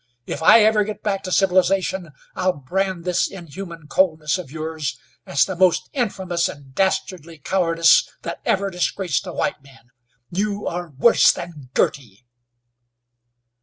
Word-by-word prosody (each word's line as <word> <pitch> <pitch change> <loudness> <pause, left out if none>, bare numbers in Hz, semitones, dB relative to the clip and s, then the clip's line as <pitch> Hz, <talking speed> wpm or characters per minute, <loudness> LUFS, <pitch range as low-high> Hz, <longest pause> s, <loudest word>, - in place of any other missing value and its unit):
If - - -5
I 225 +7 +7
ever 215 -1 +4
get 210 0 -7
back 195 -2 -1
to 185 - -4
civilization 185 -1 +2 0.3
I'll 185 0 +1
brand 180 +5 -2
this 180 -1 +1
inhuman 170 -2 -9
coldness 160 -2 +1
of 170 -7 -8
yours, 155 -1 -4 0.3
as 140 0 +3
the 190 - -5
most 180 -1 +2
infamous 190 -9 -1
and 140 -2 -12
dastardly 180 -2 -1
cowardice 165 +1 +3
that - - -6
ever 195 0 0
disgraced 180 -1 -1
a - - -4
white 190 -4 -2
man. 135 -3 -20 0.4
You 205 +2 -2
are 175 0 -4
worse 145 - +5
than 150 -7 -9
Girty!" 120 -4 -1
175 Hz, 140 wpm, -21 LUFS, 155-190 Hz, 0.4 s, I